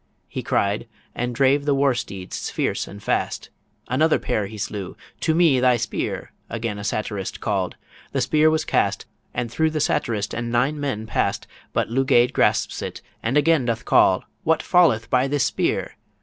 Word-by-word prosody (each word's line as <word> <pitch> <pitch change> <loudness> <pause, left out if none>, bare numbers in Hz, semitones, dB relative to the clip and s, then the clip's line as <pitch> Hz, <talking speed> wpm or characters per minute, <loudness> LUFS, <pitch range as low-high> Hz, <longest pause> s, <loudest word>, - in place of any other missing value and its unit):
He - - -5
cried, 100 +4 0 0.3
and 125 0 -3
drave 140 +2 +3
the 145 -1 +2
war 135 -1 +3
steeds 100 -6 -5
fierce - - -1
and 100 0 -11
fast. - - -1 0.4
Another 155 +6 +3
pair 105 -5 -1
he 110 +2 -9
slew, 100 -2 -5 0.2
"To 160 - +1
me 160 -6 +4
thy 125 -1 +4
spear," - - -3 0.2
Again 115 -3 -3
a - - -6
satirist 105 -2 -3
call'd. 95 -4 -1 0.4
The 135 - 0
spear 155 +5 +4
was 155 0 0
cast, - - +1 0.3
And 120 -2 -3
through 160 +5 +2
the 155 0 -2
satirist 110 -7 0
and 120 0 -3
nine 135 +6 +1
men 130 -7 -2
pass'd 110 - -1 0.3
But - - -1
Lugaid 125 -1 +3
grasps - - +1
it, - - -6 0.2
and 120 +6 +1
again 150 -2 +3
doth 115 -1 -2
call, 95 0 +4 0.2
"What 160 0 +2
falleth 160 - +4
by 130 +1 +3
this 145 -1 +1
spear?" - - -1
125 Hz, 175 wpm, -23 LUFS, 110-145 Hz, 0.4 s, me